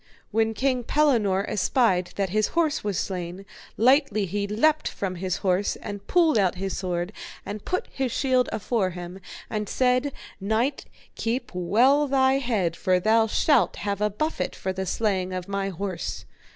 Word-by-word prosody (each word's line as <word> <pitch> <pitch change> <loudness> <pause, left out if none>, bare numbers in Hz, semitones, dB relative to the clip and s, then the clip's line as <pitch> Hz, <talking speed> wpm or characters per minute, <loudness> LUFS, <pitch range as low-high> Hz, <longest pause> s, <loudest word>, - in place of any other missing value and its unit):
When 225 +1 +1
King 255 +1 0
Pellinore 225 -9 +2
espied 185 -3 +1
that 195 -2 -1
his 215 +1 +2
horse 320 -3 +2
was 205 -4 -1
slain, 180 0 -4 0.3
lightly 250 -4 +3
he 200 +2 -2
leapt 300 +9 +2
from 195 -2 -3
his 185 +1 -2
horse 185 +2 +1
and 205 -1 -8
pulled 325 -9 +4
out 185 -3 +2
his 195 0 -3
sword, 180 +1 -3 0.3
and 205 0 -6
put 365 - -1
his 265 -2 -2
shield 255 -1 +2
afore 205 -1 0
him, 180 +1 -8 0.3
and 210 -2 -3
said, 255 +2 +2 0.3
Knight, 220 +7 0 0.3
keep 235 +3 -2
well 245 +12 +3
thy 265 0 +3
head, 210 -10 0
for 185 +1 +2
thou 220 +3 +3
shalt 285 +4 +3
have 200 0 -3
a 210 - +2
buffet 305 +11 -2
for 190 - -3
the 190 0 -4
slaying 190 -3 0
of 185 0 -4
my 195 0 -2
horse. 190 0 -4
210 Hz, 165 wpm, -25 LUFS, 190-255 Hz, 0.3 s, pulled